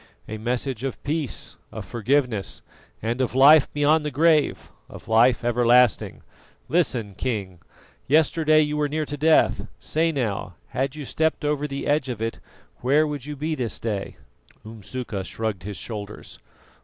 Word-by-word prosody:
"A 110 0 -6
message 125 +1 -2
of 135 -2 -4
peace, 145 -4 -2
of 110 - -7
forgiveness, 120 0 -1 0.4
and 120 +3 -1
of 125 -1 -1
life 145 +3 +7
beyond 150 +2 +2
the 150 - -2
grave, 155 +1 +2 0.2
of - - -12
life 120 +2 +4
everlasting. 120 -1 +3 0.4
Listen, 125 - 0
King. 100 -7 -4 0.5
Yesterday 155 +1 +4
you 150 0 -1
were 150 -1 0
near 155 +1 -1
to 145 - -5
death; 155 +2 +3
say 165 +1 0
now, 110 - -3
had 135 +2 -2
you 150 -2 -6
stepped 160 +2 -1
over 150 0 0
the 140 -1 -5
edge 145 -2 +1
of 120 -4 -4
it, 115 0 -3 0.4
where 145 +5 +3
would 145 -3 -5
you 150 - -5
be 155 +3 -2
this 125 -7 -2
day?" 105 -4 -4 0.5
Umsuka 110 -1 -6
shrugged 110 -1 -4
his 105 -2 -5
shoulders. 105 -1 -7
130 Hz, 155 wpm, -24 LUFS, 115-150 Hz, 0.5 s, life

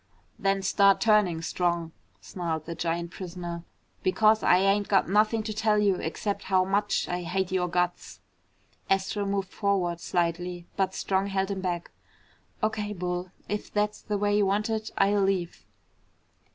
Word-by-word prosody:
"Then 195 0 +1
start 195 0 +4
turning, 205 -7 +3
Strong," 170 -1 -1 0.3
snarled 165 -4 -4
the 170 - -4
giant 170 0 -2
prisoner, 175 -2 -6 0.4
"because 215 +4 +3
I 180 - +5
ain't 195 +2 +2
got 195 - +3
nothing 215 +3 +2
to 215 0 -4
tell 215 0 +2
you 200 -3 +3
except 200 +5 -3
how 185 -1 +3
much 205 +2 0
I 180 0 -2
hate 185 +2 -2
your 180 -1 +1
guts!" 180 0 -2 0.7
Astro 195 +1 0
moved 195 -1 -1
forward 185 -4 0
slightly, 175 0 -2
but 190 -1 0
Strong 195 0 0
held 195 0 -1
him 195 -1 -3
back. 175 -2 -3 0.7
"O.K., 210 -1 -1
Bull. 180 -1 -3 0.2
If 210 0 -4
that's 210 0 -1
the 210 - -2
way 205 0 +1
you 205 -2 +3
want 210 +3 0
it, 220 0 -2
I'll 200 +1 +3
leave." 190 -3 -1
195 Hz, 155 wpm, -27 LUFS, 175-205 Hz, 0.7 s, I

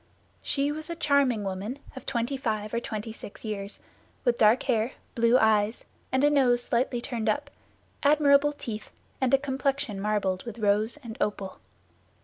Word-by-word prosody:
She 285 0 0
was 310 +2 -5
a 340 - -3
charming 280 -8 +2
woman 195 +6 -4 0.2
of 265 - -10
twenty 240 +1 -1
five 215 -5 -2
or 235 - +1
twenty 220 -1 -5
six 220 0 -10
years, 205 -1 -4 0.5
with 240 -1 +2
dark 225 +4 +5
hair, 235 -2 +1 0.2
blue 235 +1 +4
eyes, 220 -1 +2 0.3
and 260 +1 +2
a 290 - +6
nose 245 -4 +3
slightly 245 +1 0
turned 235 -3 -2
up, 215 - -1 0.5
admirable 290 0 +5
teeth, 225 -7 -6 0.3
and 260 -2 +2
a 275 - +7
complexion 270 -5 -1
marbled 195 -3 0
with 235 -2 -7
rose 215 +3 +2
and 230 -2 -8
opal. 195 -2 -2
235 Hz, 160 wpm, -27 LUFS, 215-275 Hz, 0.5 s, a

